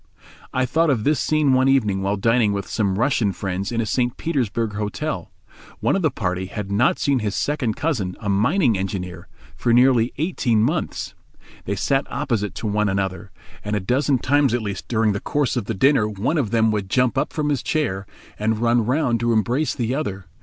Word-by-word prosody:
I 130 0 +1
thought 160 +6 +2
of 120 -6 +1
this 150 +3 +2
scene 155 -3 +2
one 130 +1 +3
evening 110 -8 +2
while 100 +1 0
dining 115 0 +2
with 100 -1 -3
some 100 -3 0
Russian 120 -4 +2
friends 95 +2 -3
in 115 - -1
a - - -2
St. 120 +3 0
Petersburg 115 -8 -1
Hotel. 105 0 -4 0.5
One - - +1
of 195 - 0
the 160 - +3
party 95 -6 -3
had 100 0 -6
not 115 +7 +3
seen 140 -3 +1
his 105 -2 -2
second 130 -7 -1
cousin, 120 - -2
a 105 - -6
mining 120 - +2
engineer, 90 -2 -5 0.3
for 120 - 0
nearly 125 -1 +4
eighteen 130 - +1
months. 155 +7 -2 0.5
They 100 - -2
sat 135 +7 0
opposite 115 -8 -2
to - - -6
one 105 0 +1
another, 95 +1 -2 0.3
and 105 +1 -2
a - - +1
dozen 130 +7 +1
times 140 -1 +2
at 120 - -2
least 100 -2 -5
during 110 -2 +2
the 100 - -2
course 145 +2 -1
of - - -2
the 110 - -3
dinner 130 -1 +3
one 110 - -1
of 120 -7 -1
them 110 0 +2
would 100 -3 -2
jump 125 +4 +2
up 135 - 0
from 150 -1 -1
his 140 -4 0
chair, 100 - -1 0.3
and 110 +1 +1
run 115 +1 +2
round 125 0 +1
to 120 +1 +1
embrace 120 +7 +1
the 120 -2 -1
other. 100 -10 -3
115 Hz, 205 wpm, -22 LUFS, 100-135 Hz, 0.5 s, nearly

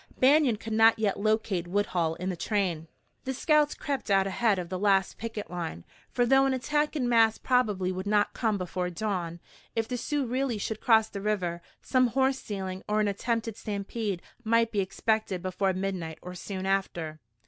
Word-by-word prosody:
Banion 275 -2 +5
could 220 +1 -6
not 225 +1 +6
yet 210 -3 0
locate 210 -4 0
Woodhull 175 -4 0
in 180 +2 -4
the 185 - -2
train. 175 -4 -1 0.4
The 265 0 -2
scouts 300 +2 +3
crept 275 -6 -3
out 195 -1 +4
ahead 205 +2 +1
of 175 -2 -4
the 185 0 -3
last 195 -2 +2
picket 225 -4 -5
line, 165 - -5 0.2
for 245 - +1
though 270 +2 +5
an 265 - +1
attack 295 +4 0
in 255 -5 0
mass 225 -2 +4
probably 210 -8 +1
would 185 +2 -4
not 205 0 +2
come 220 -3 0
before 180 -1 -3
dawn, 175 -2 -3 0.4
if 225 -1 0
the 250 - -3
Sioux 290 +3 -1
really 250 -1 -1
should 215 +1 -4
cross 220 -2 +5
the 200 - -7
river, 185 -5 -1 0.2
some 255 -1 +3
horse 265 +2 +1
stealing 190 -2 -5
or 210 0 +2
an 210 - +2
attempted 225 +2 -1
stampede 205 -2 -4 0.2
might 230 0 +2
be 205 - 0
expected 195 -1 -1
before 190 +1 0
midnight 185 -4 -3
or 180 - -7
soon 190 +1 -5
after. 175 -5 -1
210 Hz, 185 wpm, -28 LUFS, 185-230 Hz, 0.4 s, not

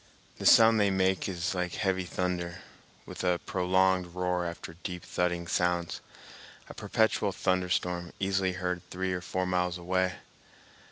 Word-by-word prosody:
The - - +1
sound 115 -1 +7
they 100 -1 +4
make 95 0 +1
is 90 -1 -2
like 90 -1 -2
heavy 95 -3 0
thunder, 90 -1 -3 0.4
with - - -7
a 90 -1 +2
prolonged 95 -1 +1
roar 90 -1 0
after 85 -1 -7
deep 90 -2 -5
thudding 85 -1 -1
sounds—a 85 -1 -4
perpetual 110 -2 +1
thunderstorm 90 -1 -1
easily 95 -1 +1
heard 90 -1 -2
three 95 0 -2
or 90 - -3
four 95 +1 -2
miles 90 -1 0
away. 90 +1 0
90 Hz, 135 wpm, -29 LUFS, 90-95 Hz, 0.4 s, sound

